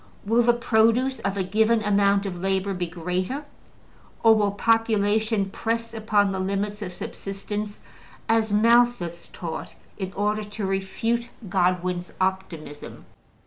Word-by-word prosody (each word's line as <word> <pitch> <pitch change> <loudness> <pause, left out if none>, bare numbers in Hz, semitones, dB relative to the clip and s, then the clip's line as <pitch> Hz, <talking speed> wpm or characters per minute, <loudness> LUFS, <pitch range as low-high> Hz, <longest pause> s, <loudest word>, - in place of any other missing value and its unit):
Will 225 +3 +3
the 240 0 +4
produce 235 +2 +2
of 195 0 -2
a 190 - +1
given 220 +4 +2
amount 200 -1 +3
of 180 -3 -5
labor 195 +1 0
be 180 -1 -2
greater? 180 - -3 0.8
Or 225 -1 +8
will 210 -2 +2
population 215 -1 +1
press 230 +1 -2
upon 210 -3 +2
the 190 - -3
limits 200 +2 -2
of 185 -3 -4
subsistence, 205 +3 -6 0.5
as 225 -1 +2
Malthus 220 -6 +3
taught 165 -2 -6 0.2
in 190 -1 -3
order 210 +1 0
to 205 0 -5
refute 225 +5 -1 0.2
Godwin's 180 -1 0
optimism? 175 -6 -4
205 Hz, 130 wpm, -25 LUFS, 190-225 Hz, 0.8 s, Or